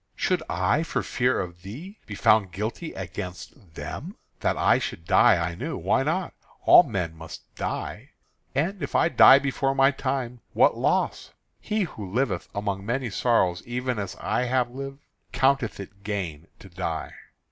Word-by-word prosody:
Should 180 -3 0
I, 150 - +1
for 165 - -2
fear 125 +1 +1
of 85 -1 -6
thee, 150 - -9
be 105 - -6
found 100 -1 +3
guilty 110 - -4
against 90 - -8
them? - - -6 0.2
That - - 0
I - - +4
should 80 - -5
die 115 +6 +6
I 85 0 -1
knew. - - -4
Why - - +1
not? - - -1 0.3
All - - +10
men 85 -4 -3
must 80 0 -10
die. - - -5 0.4
And 175 +7 0
if 140 - -4
I - - +4
die 135 - +8
before 135 0 0
my 135 0 +5
time, 130 -3 -3
what - - +4
loss? - - 0 0.3
He 215 -1 -1
who 105 - -7
liveth 115 -6 -1
among 100 -1 -2
many 120 +2 -2
sorrows 95 -6 +2
even 125 -1 -2
as 100 -2 -4
I 125 - 0
have 125 -1 +1
lived, 135 +2 -7 0.3
counteth 135 -5 +1
it 100 0 -10
gain 90 -7 -4
to - - -14
die. 85 -3 -4
115 Hz, 165 wpm, -25 LUFS, 95-135 Hz, 0.4 s, All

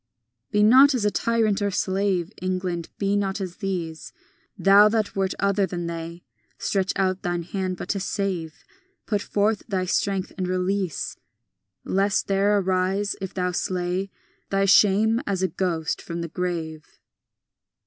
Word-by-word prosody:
XII 115 +1 -55
Be 210 0 +3
not 265 +6 +7
as 215 -4 +1
tyrant 225 -3 +1
or 205 - +1
slave, 190 -2 0
England; 185 -2 -2
be 200 0 0
not 200 0 -1
as 185 -2 -5
these, 175 -6 -4 0.5
Thou 200 +2 +6
that 215 -1 -1
wert 190 -1 0
other 200 0 +1
than 175 -2 -4
they. 170 +1 -6 0.3
Stretch 195 -1 0
out 185 -1 0
thine 175 -1 -2
hand, 185 +1 -3
but - - -6
to 200 - 0
save; 185 -4 -3 0.4
Put 205 -2 0
forth 210 +1 0
thy 190 -4 -1
strength, 195 0 -1
and 185 - -1
release; 185 -2 -1 0.7
Lest 195 +1 +1
there 200 +1 +3
arise, 190 +1 0
if 190 -1 -6
thou 180 -1 0
slay, 180 +2 -2 0.4
Thy 195 0 +2
shame 210 +4 +4
as 190 -2 -1
a - - +3
ghost 170 -5 -2
from 170 0 -5
the 170 - -4
grave. 165 -3 -3
190 Hz, 150 wpm, -24 LUFS, 175-200 Hz, 0.7 s, not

